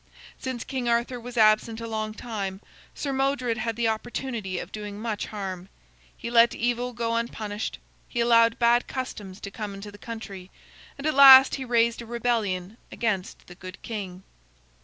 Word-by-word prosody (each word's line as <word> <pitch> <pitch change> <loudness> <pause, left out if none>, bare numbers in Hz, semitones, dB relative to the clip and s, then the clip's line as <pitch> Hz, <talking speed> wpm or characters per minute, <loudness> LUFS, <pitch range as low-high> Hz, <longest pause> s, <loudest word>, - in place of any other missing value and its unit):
Since 260 -3 -4
King 255 -3 -3
Arthur 235 +1 0
was 245 +1 -9
absent 215 +1 +4
a 230 - -5
long 215 -1 -3
time, 200 -5 -4 0.4
Sir 280 -2 -3
Modred 265 -3 0
had 230 -2 -2
the 235 0 0
opportunity 225 -3 -3
of - - -6
doing 210 -1 -6
much 220 -2 -3
harm. 190 -3 -6 0.5
He 235 - -6
let 235 0 +5
evil 245 +1 -1
go 230 -1 -2
unpunished; 220 -2 -3 0.3
he 240 - -3
allowed 230 -1 +4
bad 240 0 +3
customs 210 -7 -6
to 200 - -7
come 205 -1 -6
into 200 +1 -8
the 205 - -14
country; 200 -5 -8 0.5
and 275 - -7
at 310 - +2
last 270 -1 +10
he 265 - -3
raised 235 -1 +2
a 235 - -10
rebellion 220 -5 -1
against 205 -5 -2
the 180 - -12
good 185 0 -10
king. 190 -5 -6
230 Hz, 170 wpm, -26 LUFS, 205-240 Hz, 0.5 s, last